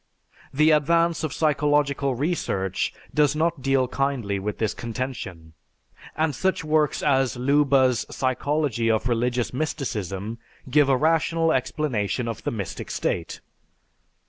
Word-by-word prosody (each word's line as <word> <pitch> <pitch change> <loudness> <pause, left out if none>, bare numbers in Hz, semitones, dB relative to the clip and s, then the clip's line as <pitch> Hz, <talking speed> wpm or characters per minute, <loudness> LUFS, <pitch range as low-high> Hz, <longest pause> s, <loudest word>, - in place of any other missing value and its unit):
The 155 +4 +4
advance 165 +3 +2
of 155 - -1
psychological 145 -3 +1
research 120 - -1 0.2
does 150 -1 +3
not 165 -1 0
deal 135 -1 +2
kindly 125 -7 -1
with 105 +2 -4
this 110 -2 -1
contention, 110 -9 -6 0.6
and 155 -1 +1
such 185 +7 0
works 155 -1 +1
as 135 -4 +2
Leuba's 135 -1 +3
"Psychology 130 -2 0
of 110 +1 +1
Religious 120 +1 0
Mysticism" 115 - -3 0.3
give 145 +1 +3
a 135 - +4
rational 165 +2 +2
explanation 125 -5 -1
of 115 -2 -4
the - - -1
mystic 100 -6 -5
state. 85 -2 -3
135 Hz, 120 wpm, -24 LUFS, 115-150 Hz, 0.6 s, The